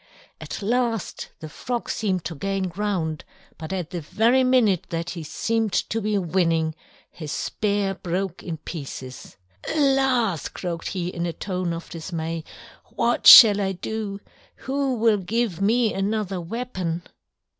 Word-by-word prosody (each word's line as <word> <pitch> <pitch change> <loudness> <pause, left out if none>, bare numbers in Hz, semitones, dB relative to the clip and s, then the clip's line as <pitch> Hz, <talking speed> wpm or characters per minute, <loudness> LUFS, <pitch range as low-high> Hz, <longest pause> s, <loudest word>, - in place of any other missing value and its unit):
At - - -6
last 230 -1 -1
the 155 - -6
Frog 240 +10 -4
seemed 190 -5 -1
to 170 - -3
gain 195 +3 -2
ground, 175 -5 -2 0.4
but 160 +1 -6
at 180 -4 -3
the 175 - -4
very 230 - +3
minute 245 -8 +3
that 170 +1 -3
he 170 - -6
seemed 220 +7 -1
to 225 - 0
be 210 0 0
winning 165 -3 +1 0.4
his 155 -4 -7
spear 200 +4 -1
broke 185 0 -3
in 165 -3 -5
pieces. 135 - -8 0.4
"Alas!" 265 - +2
croaked 170 -2 -5
he 180 -2 -3
in 175 -1 -3
a 170 - -3
tone 185 0 -3
of 165 +1 -5
dismay, 165 -1 -4 0.4
"what 235 +1 0
shall 205 -3 +11
I 195 -1 0
do? 200 +2 -4 0.4
Who 270 -1 -1
will 225 -2 +3
give 200 -1 -2
me 225 +2 +2
another 195 -1 -1
weapon?" 180 -4 -4
195 Hz, 145 wpm, -24 LUFS, 170-225 Hz, 0.4 s, shall